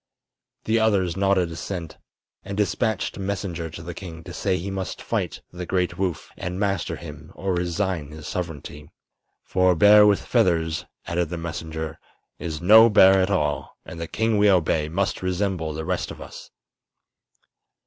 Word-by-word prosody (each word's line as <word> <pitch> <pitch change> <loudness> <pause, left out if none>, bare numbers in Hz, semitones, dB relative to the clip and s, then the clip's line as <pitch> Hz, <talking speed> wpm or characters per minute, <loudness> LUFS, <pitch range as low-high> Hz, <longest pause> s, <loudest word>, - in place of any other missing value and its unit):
The 115 +1 +2
others 100 -6 +2
nodded 95 -3 +2
assent, 85 +1 -6 0.4
and 100 +1 -6
dispatched 105 0 0
a - - -8
messenger 95 -4 -3
to 85 +2 -9
the 85 +1 -6
king 80 -3 -9
to - - -9
say 90 - 0
he 95 +3 -4
must 95 -1 -4
fight - - -3
the 90 0 -6
great 90 -2 -1
Woof 90 -5 -2
and 90 +1 -4
master 100 -5 -1
him 75 +1 -10
or 95 0 -2
resign 90 -3 -1
his 75 0 -10
sovereignty. 80 -3 -6 0.5
"For 95 0 +3
a - - -3
bear 105 +4 +7
with 100 -1 +2
feathers," 85 -8 +1 0.2
added 85 -1 -1
the 85 - -4
messenger, 80 -1 -5 0.4
"is 80 -3 -4
no 110 +6 +8
bear 95 -2 +6
at 95 - +1
all, 75 -7 -1
and 85 0 -8
the 85 - -3
king 110 +4 0
we 105 0 +5
obey 80 -4 +2
must 95 +4 -1
resemble 90 -3 -1
the 80 +1 -5
rest 90 0 -2
of - - -9
us." - - -10
90 Hz, 170 wpm, -24 LUFS, 80-100 Hz, 0.5 s, no